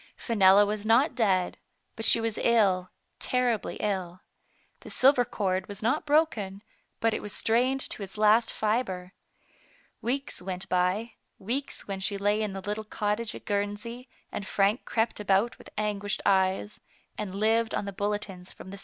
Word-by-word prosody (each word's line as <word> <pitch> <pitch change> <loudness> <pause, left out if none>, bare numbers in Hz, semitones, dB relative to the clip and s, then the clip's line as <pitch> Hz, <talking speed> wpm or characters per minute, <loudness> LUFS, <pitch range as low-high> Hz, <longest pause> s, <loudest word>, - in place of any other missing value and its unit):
Fenella 205 -3 +5
was 210 0 -3
not 235 +8 +4
dead, 190 -6 +1 0.4
but 225 - -2
she - - +6
was 225 -1 -2
ill 195 -6 +3 0.2
— - - -47
terribly 250 -4 0
ill. 185 -4 -3 0.6
The - - -12
silver 260 -1 +4
cord 190 -6 -2
was 205 +1 -6
not 290 +7 0
broken, 220 -11 +1 0.4
but 225 -1 +2
it - - -2
was 210 - -5
strained 250 +4 +2
to - - -2
its 195 +1 -8
last 215 +2 +4
fiber. 205 -4 -1 0.9
Weeks 255 +1 -2
went 185 0 -5
by, 185 +6 0 0.3
weeks 250 +8 -4
when 195 -1 -4
she 200 +1 -1
lay 205 +2 +1
in 210 -2 -2
the 195 - -5
little 210 +3 -3
cottage 210 +1 -2
at - - -11
Guernsey, 205 +5 -3 0.2
and 200 - -5
Frank 200 +4 +1
crept 225 -1 0
about 205 +3 +1
with - - -13
anguished 205 -1 -2
eyes, 190 +1 +1 0.4
and 195 -3 -5
Jived 220 +2 +1
on - - -3
the 200 - -5
bulletins 200 -2 -4
from 190 - -11
the 200 - -8
210 Hz, 165 wpm, -28 LUFS, 195-230 Hz, 0.9 s, she